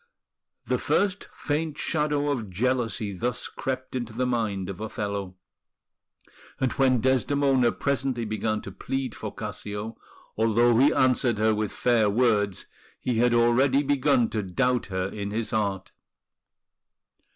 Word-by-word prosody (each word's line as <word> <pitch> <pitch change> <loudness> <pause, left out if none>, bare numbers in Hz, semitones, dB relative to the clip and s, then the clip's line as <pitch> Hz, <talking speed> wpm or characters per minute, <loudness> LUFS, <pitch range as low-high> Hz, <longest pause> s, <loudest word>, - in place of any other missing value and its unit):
The - - 0
first 200 -1 0
faint 155 0 -2
shadow 145 -2 0
of 115 -7 -3
jealousy 115 0 -1
thus 120 +5 -2
crept 130 -1 -4
into 120 -3 -4
the 125 +3 -1
mind 110 -6 -1
of 100 0 -7
Othello; 100 -3 -4 1.2
and 130 - +1
when 130 -3 +2
Desdemona 130 -1 +2
presently 135 -4 -1
began 110 0 -1
to 100 - -8
plead 130 +5 -3
for 110 - -6
Cassio, 105 +1 -6 0.4
although 115 +2 +3
he 140 +3 +6
answered 125 -4 +2
her 110 +1 +3
with 105 -1 -2
fair 115 -4 +2
words, 105 -3 +1 0.3
he 125 -3 -1
had 120 0 +3
already 130 +4 +4
begun 140 -3 +2
to 110 - -1
doubt 125 +6 0
her 95 -1 -2
in 100 0 -5
his 110 +2 -3
heart. 100 -4 -1
120 Hz, 135 wpm, -26 LUFS, 105-130 Hz, 1.2 s, he